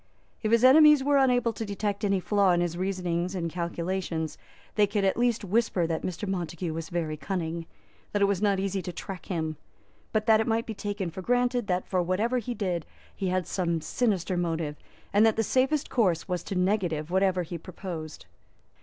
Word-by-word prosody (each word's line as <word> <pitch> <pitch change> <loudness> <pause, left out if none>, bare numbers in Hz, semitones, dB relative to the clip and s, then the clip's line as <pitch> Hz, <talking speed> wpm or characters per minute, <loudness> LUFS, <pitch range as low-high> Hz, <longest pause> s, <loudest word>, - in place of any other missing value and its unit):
If 215 - -1
his 230 +1 +4
enemies 300 +1 +8
were 285 0 +4
unable 245 -3 +3
to 225 - -5
detect 205 0 -3
any 195 -2 +2
flaw 200 -1 +3
in 175 - +2
his 175 -1 -1
reasonings 180 -1 -2
and 170 -2 -2
calculations, 170 -1 -3 0.4
they 210 -1 +4
could 205 -1 0
at 190 - +2
least 235 -3 +1
whisper 200 -3 +1
that 165 -1 -2
Mr. 185 +3 -4
Montague 175 -2 -3
was 165 0 -5
very 160 -3 -2
cunning, 170 -2 -3 0.4
that 205 - 0
it 200 - +5
was 200 -1 0
not 200 -2 +2
easy 195 0 -1
to 180 - -5
track 185 +1 -8
him, 160 -5 -2 0.5
but 215 -1 0
that 220 -1 +5
it - - -2
might 230 0 +1
be 220 - -4
taken 200 -3 -3
for 190 - -7
granted 245 +1 +1
that 180 0 0
for 185 -2 +1
whatever 210 +8 0
he 240 +1 -4
did 180 -7 -2 0.3
he 195 - -2
had 185 -1 0
some 170 -3 -1
sinister 190 -1 0
motive, 165 -3 -1 0.4
and 205 +2 +5
that 225 -1 +4
the 225 - +1
safest 265 +6 +1
course 185 -9 +1
was 180 -2 -2
to 200 - -4
negative 180 -4 0
whatever 190 -1 +2
he 170 0 -6
proposed. 165 -3 -7
190 Hz, 200 wpm, -27 LUFS, 175-215 Hz, 0.5 s, enemies